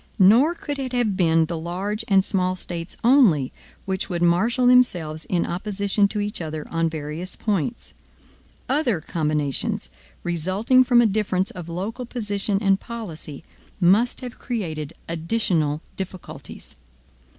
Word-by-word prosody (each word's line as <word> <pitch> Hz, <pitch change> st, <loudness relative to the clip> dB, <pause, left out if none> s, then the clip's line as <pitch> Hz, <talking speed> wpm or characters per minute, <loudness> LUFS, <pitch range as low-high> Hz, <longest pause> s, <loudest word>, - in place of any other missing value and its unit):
Nor 235 Hz, -, +6 dB
could 290 Hz, -4 st, -5 dB
it 260 Hz, -2 st, -4 dB
have 235 Hz, -5 st, +1 dB
been 165 Hz, -3 st, +3 dB
the 165 Hz, 0 st, -4 dB
large 190 Hz, +6 st, -3 dB
and 195 Hz, -2 st, +4 dB
small 185 Hz, -2 st, 0 dB
States 170 Hz, -1 st, -6 dB
only, 225 Hz, -, +4 dB, 0.3 s
which 190 Hz, -1 st, -2 dB
would 175 Hz, -2 st, -1 dB
marshal 220 Hz, +9 st, +3 dB
themselves 175 Hz, -12 st, +3 dB
in 175 Hz, -2 st, 0 dB
opposition 200 Hz, +2 st, 0 dB
to 210 Hz, -, -3 dB
each 205 Hz, -2 st, -2 dB
other 155 Hz, -2 st, -5 dB
on 165 Hz, 0 st, +1 dB
various 160 Hz, +3 st, -5 dB
points. 210 Hz, +2 st, -2 dB, 0.7 s
Other 260 Hz, -, +1 dB
combinations, 150 Hz, -3 st, -2 dB, 0.3 s
resulting 185 Hz, +9 st, +2 dB
from 245 Hz, -1 st, +5 dB
a -, -, +3 dB
difference 195 Hz, -3 st, 0 dB
of 175 Hz, -2 st, -8 dB
local 210 Hz, +8 st, -4 dB
position 205 Hz, -4 st, -2 dB
and 195 Hz, -1 st, +3 dB
policy, 170 Hz, -11 st, -7 dB, 0.4 s
must 200 Hz, +9 st, +3 dB
have 250 Hz, -1 st, -8 dB
created 160 Hz, -, -4 dB
additional 165 Hz, -3 st, 0 dB, 0.2 s
difficulties. 190 Hz, -1 st, -8 dB
190 Hz, 135 wpm, -23 LUFS, 165-225 Hz, 0.7 s, Nor